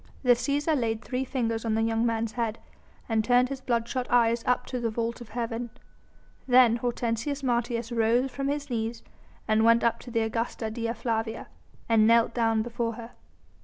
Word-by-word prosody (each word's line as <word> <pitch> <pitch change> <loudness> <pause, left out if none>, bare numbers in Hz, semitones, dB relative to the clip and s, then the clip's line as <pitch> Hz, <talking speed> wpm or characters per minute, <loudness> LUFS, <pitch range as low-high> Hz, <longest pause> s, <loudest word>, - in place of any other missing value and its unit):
The 250 - +5
Cæsar 285 +5 +1
laid 225 -4 -1
three 255 0 -2
fingers 230 -4 -2
on 225 -2 0
the 225 - +1
young 225 +1 +1
man's 225 -1 -1
head, 230 -1 -2 0.5
and 220 -2 +1
turned 250 +2 +3
his 275 -1 -5
bloodshot 240 +1 -1
eyes 235 -1 +3
up 250 0 +2
to 250 - -4
the 235 -1 -1
vault 230 +2 -3
of 235 - -10
heaven. 235 +1 -3 0.8
Then 245 -2 +6
Hortensius 240 +3 -2
Martius 235 -2 -1
rose 235 +3 +2
from 275 +1 -3
his 285 -1 -3
knees 230 0 -3 0.4
and 220 0 +3
went 230 +1 +5
up 235 - +2
to 245 - -11
the 230 -1 0
Augusta 225 0 -2
Dea 230 0 -2
Flavia, 225 -2 -3 0.4
and 220 -2 +4
knelt 230 0 +4
down 225 -2 +1
before 235 0 -3
her. 230 +1 -9
235 Hz, 180 wpm, -27 LUFS, 225-245 Hz, 0.8 s, Then